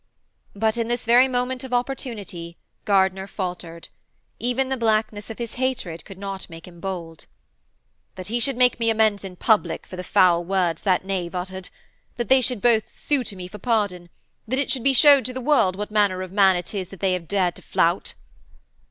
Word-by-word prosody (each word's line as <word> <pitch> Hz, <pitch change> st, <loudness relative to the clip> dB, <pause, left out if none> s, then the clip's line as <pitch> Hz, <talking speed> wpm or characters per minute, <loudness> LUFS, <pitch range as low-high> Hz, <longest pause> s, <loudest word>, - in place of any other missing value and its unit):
But, 220 Hz, +2 st, +1 dB
in 230 Hz, -1 st, -1 dB
this 240 Hz, +1 st, -2 dB
very 245 Hz, +3 st, +6 dB
moment 250 Hz, 0 st, -2 dB
of 260 Hz, -, -7 dB
his 250 Hz, -, 0 dB
opportunity, 210 Hz, -10 st, -4 dB, 0.3 s
Gardiner 190 Hz, -1 st, +2 dB
faltered. 175 Hz, -4 st, -6 dB, 0.5 s
Even 250 Hz, +2 st, 0 dB
the 265 Hz, -, 0 dB
blackness 220 Hz, -3 st, 0 dB
of 225 Hz, -, -7 dB
his 235 Hz, -2 st, -5 dB
hatred 235 Hz, -11 st, -2 dB
could 195 Hz, -, -11 dB
not 195 Hz, -1 st, -6 dB
make 165 Hz, +1 st, -11 dB
him 175 Hz, -1 st, -14 dB
bold. 170 Hz, -3 st, -6 dB, 0.9 s
'That 185 Hz, -, -7 dB
he 230 Hz, +5 st, -1 dB
should 265 Hz, +1 st, +1 dB
make 250 Hz, -1 st, +3 dB
me 230 Hz, -1 st, +1 dB
amends 215 Hz, -2 st, +2 dB
in 190 Hz, -2 st, -8 dB
public 215 Hz, +3 st, +1 dB
for 185 Hz, -, -10 dB
the 180 Hz, -, -5 dB
foul 175 Hz, -1 st, +4 dB
words 180 Hz, -3 st, 0 dB
that 190 Hz, -2 st, +1 dB
knave 185 Hz, -2 st, -3 dB
uttered. 185 Hz, +1 st, -5 dB, 0.5 s
That 240 Hz, -, -3 dB
they 265 Hz, 0 st, +6 dB
should 250 Hz, -3 st, -1 dB
both 230 Hz, -3 st, +3 dB
sue 285 Hz, -3 st, -1 dB
to 200 Hz, -, -5 dB
me 180 Hz, -1 st, -7 dB
for 210 Hz, +3 st, -11 dB
pardon: 200 Hz, -6 st, -1 dB, 0.4 s
that 260 Hz, +4 st, -1 dB
it 275 Hz, -1 st, 0 dB
should 255 Hz, -3 st, 0 dB
be 275 Hz, 0 st, +4 dB
showed 280 Hz, +1 st, +7 dB
to 255 Hz, -, -4 dB
the 260 Hz, -, -4 dB
world 250 Hz, -9 st, +3 dB
what 210 Hz, +2 st, -5 dB
manner 200 Hz, -3 st, +2 dB
of 185 Hz, -, -8 dB
man 195 Hz, -1 st, +5 dB
it 175 Hz, +2 st, -4 dB
is 190 Hz, -3 st, -4 dB
that 195 Hz, -, -12 dB
they 190 Hz, -2 st, +1 dB
have 175 Hz, -2 st, -4 dB
dared 185 Hz, -3 st, +1 dB
to -, -, -11 dB
flout.' -, -, 0 dB
205 Hz, 205 wpm, -23 LUFS, 185-240 Hz, 0.9 s, showed